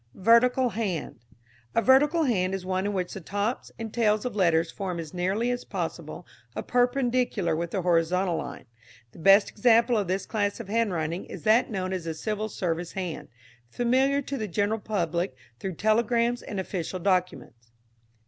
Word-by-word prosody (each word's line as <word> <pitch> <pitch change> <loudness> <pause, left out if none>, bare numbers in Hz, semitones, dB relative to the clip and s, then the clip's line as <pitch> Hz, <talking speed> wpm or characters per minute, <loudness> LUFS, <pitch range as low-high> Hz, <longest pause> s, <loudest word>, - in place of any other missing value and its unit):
Vertical 240 +5 +4
Hand. 195 - -3 0.6
A 230 - +4
vertical 295 +5 +4
hand 190 -8 +1
is 185 -1 -6
one 185 +1 -1
in 205 - -2
which 180 -2 -2
the 195 - -7
tops 205 +7 -3
and 225 -2 -6
tails 215 -1 +2
of 250 - -3
letters 170 -4 +2
form 185 -3 -4
as 160 -2 -7
nearly 195 +7 0
as 245 - -3
possible - - -5 0.3
a - - -3
perpendicular 245 - +1
with 170 +1 -2
the 185 +1 -2
horizontal 175 +1 +2
line. 140 - -6 0.5
The - - -15
best 195 +4 +5
example 230 +1 +4
of 200 - -2
this 190 +2 -1
class 205 -1 -1
of 220 -4 -8
handwriting 180 -7 -1
is - - -9
that 220 +3 +4
known 190 -3 -3
as 180 -3 -4
the 165 -1 -3
Civil 215 +5 -3
Service 175 -3 -3
hand, 180 -4 -5 0.4
familiar 260 - +1
to 275 +1 -4
the 215 - -2
general 205 +4 0
public 175 -7 -2 0.2
through 185 +5 -4
telegrams 235 +4 +1
and 200 - -5
official 185 -1 -4
documents. 175 -11 -2
200 Hz, 170 wpm, -27 LUFS, 180-230 Hz, 0.6 s, best